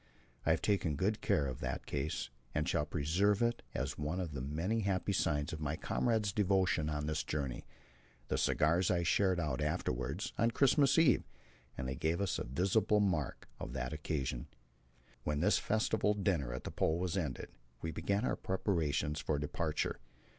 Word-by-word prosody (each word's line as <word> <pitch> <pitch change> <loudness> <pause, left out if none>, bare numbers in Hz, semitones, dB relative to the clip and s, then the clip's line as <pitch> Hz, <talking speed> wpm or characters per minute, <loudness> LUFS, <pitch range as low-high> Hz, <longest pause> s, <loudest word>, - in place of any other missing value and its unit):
I - - +5
have - - +2
taken 90 -7 +1
good 100 +8 0
care 70 - +2
of 65 -2 -4
the - - -2
case, 70 -2 -2 0.2
and - - +1
shall 75 - +1
preserve 90 +9 +2
it 120 0 +1
as 70 +4 -2
one 75 +5 -2
of 90 -4 -3
the 70 -2 -4
many 80 - -1
happy 100 -1 0
signs 75 -6 0
of 80 - -4
my 75 0 -1
comrades' 110 +2 0
devotion 95 -6 +2
on 75 -1 -2
this 75 0 -1
journey. 70 -5 -3 0.6
The - - 0
cigars 85 +4 +3
I 85 -1 +2
shared 95 +1 +3
out 75 -4 -1
afterwards, 75 - -2
on 115 - +4
Christmas 140 +3 +4
Eve, 160 -7 +5 0.5
and 65 - -3
they 65 - -2
gave 80 +5 0
us 100 -3 0
a - - -2
visible 95 - +2
mark 85 -9 0
of - - -6
that 65 +1 -3
occasion. 70 -5 -3 0.8
When 75 -1 -1
this 100 +6 +4
festival 110 -1 +1
dinner 90 - 0
at 65 - -5
the - - -5
Pole 80 - +1
was 90 0 -1
ended, 80 -9 -2 0.3
we 80 - -2
began 100 +7 0
our - - +1
preparations 80 -6 0
for 75 - 0
departure. 75 +2 -2
85 Hz, 175 wpm, -34 LUFS, 75-100 Hz, 0.8 s, I